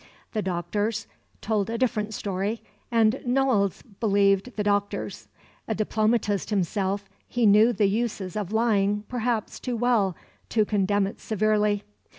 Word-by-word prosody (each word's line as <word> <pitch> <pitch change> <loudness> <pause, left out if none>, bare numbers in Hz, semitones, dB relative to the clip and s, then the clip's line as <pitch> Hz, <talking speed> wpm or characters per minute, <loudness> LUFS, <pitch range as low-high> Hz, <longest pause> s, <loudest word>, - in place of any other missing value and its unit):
The 215 - -1
doctors 205 +4 -2 0.4
told 215 -1 0
a 230 - -2
different 220 -4 0
story, 200 +3 -2 0.3
and 230 +1 +3
Noailles 245 -6 +1 0.2
believed 200 +1 +2
the 210 - -1
doctors. 205 0 -1 0.4
A 220 - -1
diplomatist 215 -2 0
himself, 200 0 -1 0.2
he 240 -1 +1
knew 210 +3 +6
the 220 -3 +2
uses 200 -3 -1
of 210 -3 -3
lying 210 -2 +2
perhaps 240 -3 -2
too 250 -2 -3
well 220 -6 +2 0.3
to 215 -2 +2
condemn 205 -1 +1
it 195 - -6
severely. 210 -1 +1
210 Hz, 135 wpm, -26 LUFS, 200-225 Hz, 0.4 s, knew